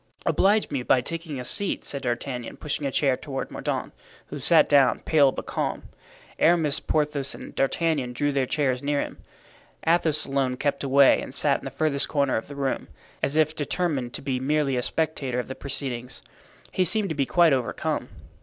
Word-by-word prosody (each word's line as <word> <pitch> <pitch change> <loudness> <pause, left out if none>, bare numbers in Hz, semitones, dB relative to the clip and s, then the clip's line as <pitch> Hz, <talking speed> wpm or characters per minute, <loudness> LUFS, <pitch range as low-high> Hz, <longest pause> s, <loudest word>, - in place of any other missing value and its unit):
"Oblige 205 +2 +2
me 140 -3 -1
by 125 - +3
taking 165 +1 -5
a - - -4
seat," 200 - 0
said 140 - -4
D'Artagnan, 125 -1 -4
pushing 145 -1 -3
a - - -3
chair 135 -1 +2
toward 135 0 -5
Mordaunt, - - -3 0.4
who - - -6
sat - - +5
down, 140 -3 +4
pale 145 -4 +4
but - - -6
calm. - - -3 0.6
Aramis, 160 -3 +3
Porthos 150 -3 -1
and - - -10
D'Artagnan 140 -2 0
drew 145 +4 0
their 135 -2 0
chairs 130 -4 0
near 145 0 0
him. - - -5 0.7
Athos 160 -2 +2
alone 135 -2 0
kept 140 +1 -1
away 140 0 +5
and - - -7
sat 140 +1 +2
in - - -13
the - - -3
furthest 140 +1 0
corner 140 -3 +1
of 110 - -3
the 145 - -9
room, 135 -1 -2 0.3
as 140 - 0
if 155 0 +2
determined 145 -5 -2
to - - -6
be 130 -2 -1
merely 140 0 +1
a 125 - 0
spectator 140 -3 -1
of 125 - -4
the 130 - -5
proceedings. 130 -3 -4 0.5
He 185 - +2
seemed 200 +3 +1
to 160 - -2
be 140 -2 0
quite 170 -4 +4
overcome. 130 -3 -2
140 Hz, 190 wpm, -25 LUFS, 130-155 Hz, 0.7 s, sat